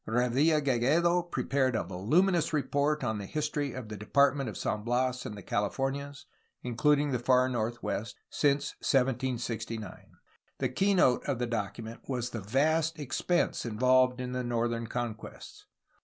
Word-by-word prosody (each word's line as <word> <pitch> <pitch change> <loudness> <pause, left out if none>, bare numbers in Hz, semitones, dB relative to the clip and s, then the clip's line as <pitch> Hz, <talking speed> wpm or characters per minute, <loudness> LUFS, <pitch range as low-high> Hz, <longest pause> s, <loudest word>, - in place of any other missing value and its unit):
Revilla 130 +7 +2
Gigedo 150 +8 +3
prepared 140 -7 0
a - - 0
voluminous 165 - +1
report 145 0 0
on 110 -3 -1
the 100 - -6
his 150 +5 -1
tory 145 -3 -3
of 125 -3 -6
the 105 - -5
Department 140 +5 +2
of 105 - -7
San 105 - -2
Bias 125 +2 0
and 105 - -7
the 100 - -9
Califomias 135 +8 -2 0.4
(including 145 +4 +2
the 125 - 0
far 125 +1 +3
northwest) 115 -3 -3
since 145 -1 +1
1769. 125 -4 -1 0.5
The 130 - -1
keynote 175 -3 +3
of 140 -3 -1
the 125 - -1
document 115 0 -4
was 125 -2 -2
the 110 - -5
vast 155 +9 +1
expense 155 +5 0
involved 125 +2 +3
in 125 0 -4
the 125 0 -2
northern 115 -1 -1
conquests. 115 -2 -6
125 Hz, 145 wpm, -30 LUFS, 115-145 Hz, 0.5 s, Gigedo